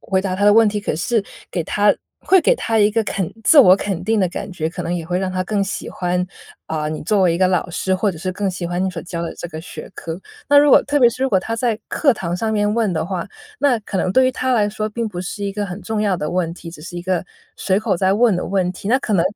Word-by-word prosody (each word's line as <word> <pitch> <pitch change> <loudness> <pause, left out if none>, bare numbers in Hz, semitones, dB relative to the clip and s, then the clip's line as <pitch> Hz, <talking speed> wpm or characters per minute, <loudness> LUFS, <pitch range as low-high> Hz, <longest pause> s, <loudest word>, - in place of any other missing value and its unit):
回 190 -1 0
答 185 -2 -2
他 205 - 0
的 205 - +7
问 225 0 +6
题。 210 0 -2
可 200 - -2
是 200 +6 0 0.3
给 170 - -2
他 205 +4 +3 0.3
会 380 0 +4
给 - - +3
他 225 - -1
一 205 0 +4
个 225 +1 +2
肯 190 -3 -2
自 305 - +6
我 185 -9 +9
肯 195 -3 -3
定 220 +2 +1
的 185 - +2
感 175 - -6
觉， 160 -4 -3
可 175 +2 -6
能 175 - -1
也 170 -2 -3
会 175 +2 -1
让 190 0 -2
他 185 0 -1
更 200 0 0
喜 195 - -4
欢 180 0 -1 0.4
啊， 155 -1 -2
你 155 0 -5
作 200 +5 +1
为 175 -2 +3
一 - - -2
个 185 - +4
老 180 -1 0
师 190 +2 -1
或 195 +2 +1
者 170 - -9
是 185 +3 -3
更 195 +1 -1
喜 180 -1 -5
欢 175 +1 -2
你 190 - +1
所 175 -3 -6
教 175 -2 -5
的 170 - -4
这 - - -6
个 155 -1 -7
学 - - -9
科。 165 0 -6 0.3
那 285 - +5
如 290 0 +6
果 - - +7
特 290 +1 +1
别 245 - +6
是 255 - -5
如 270 - +2
果 200 -6 +3
他 225 +5 -4
在 230 -2 0
课 280 -5 +3
堂 170 -4 -3
上 220 +3 -1
面 205 -1 +1
问 225 -3 +1
的 160 0 -1
话， 180 -1 -4 0.3
那 270 -5 +3
可 200 -2 -4
能 185 - 0
对 260 +3 +5
于 260 - +1
他 255 +1 -1
来 210 -3 +3
说 215 +1 -3
并 230 +2 -3
不 180 -4 -6
是 195 +3 -5
一 200 - -2
个 205 0 -3
很 180 +1 -7
重 215 +3 -2
要 200 -3 +1
的 150 -3 -3
问 175 -2 -1
题， 170 -1 -10
只 165 - -12
是 175 +3 -8
一 175 - -5
个 185 0 0 0.3
随 190 0 +1
口 215 -2 0
在 190 +2 +2
问 225 -1 +4
的 180 - -2
问 185 -2 0
题。 195 - -7
那 255 +4 +4
可 220 - -3
能 175 -4 +3
195 Hz, 320 characters per minute, -20 LUFS, 180-215 Hz, 0.4 s, 我